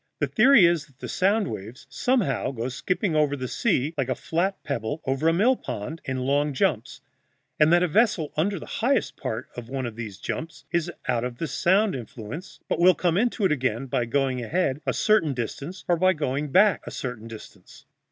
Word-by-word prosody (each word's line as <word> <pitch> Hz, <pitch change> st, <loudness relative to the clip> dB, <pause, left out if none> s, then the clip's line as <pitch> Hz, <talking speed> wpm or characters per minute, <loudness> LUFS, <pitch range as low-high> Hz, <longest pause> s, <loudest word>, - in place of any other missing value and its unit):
The 145 Hz, -, +1 dB
theory 215 Hz, -, +6 dB
is 170 Hz, -2 st, +2 dB
that 135 Hz, -3 st, -26 dB
the -, -, -7 dB
sound 200 Hz, +3 st, +1 dB
waves 110 Hz, +2 st, -7 dB
somehow 220 Hz, -, 0 dB
go 125 Hz, -1 st, -3 dB
skipping 180 Hz, -, -1 dB
over 150 Hz, -2 st, +2 dB
the 130 Hz, -1 st, -4 dB
sea, 160 Hz, -, 0 dB
like 135 Hz, -3 st, -1 dB
a 130 Hz, -, 0 dB
flat 185 Hz, +4 st, -2 dB
pebble 140 Hz, +1 st, -3 dB
over 135 Hz, +4 st, 0 dB
a -, -, +6 dB
mill 215 Hz, +10 st, +3 dB
pond, 155 Hz, -, -6 dB
in 130 Hz, -1 st, -2 dB
long 140 Hz, +3 st, +1 dB
jumps, 140 Hz, -, -1 dB, 0.6 s
and 150 Hz, +1 st, +5 dB
that 175 Hz, +1 st, +5 dB
a -, -, +3 dB
vessel 180 Hz, -4 st, +2 dB
under 195 Hz, +6 st, 0 dB
the -, -, -8 dB
highest 260 Hz, +4 st, 0 dB
part 110 Hz, -, -5 dB
of 120 Hz, -1 st, -8 dB
one 130 Hz, -1 st, -3 dB
of 115 Hz, -2 st, -5 dB
these 110 Hz, -4 st, -7 dB
jumps 160 Hz, +9 st, -6 dB
is 170 Hz, -2 st, 0 dB, 0.2 s
out 120 Hz, -2 st, +1 dB
of 125 Hz, -1 st, -4 dB
the 165 Hz, -, -2 dB
sound 190 Hz, +8 st, +2 dB
influence, 125 Hz, -, -8 dB
but -, -, -1 dB
will 180 Hz, +1 st, +6 dB
come 175 Hz, -2 st, +1 dB
into 225 Hz, 0 st, +1 dB
it 185 Hz, -, +3 dB
again 130 Hz, -3 st, 0 dB
by 125 Hz, -2 st, -1 dB
going 130 Hz, +1 st, 0 dB
ahead 150 Hz, 0 st, 0 dB
a -, -, +2 dB
certain 165 Hz, -10 st, +2 dB
distance 140 Hz, -, -5 dB
or 180 Hz, +2 st, +3 dB
going 145 Hz, 0 st, -2 dB
back 200 Hz, +4 st, +5 dB
a -, -, -2 dB
certain 120 Hz, -3 st, -6 dB
distance. 115 Hz, -2 st, -13 dB
150 Hz, 200 wpm, -25 LUFS, 125-185 Hz, 0.6 s, theory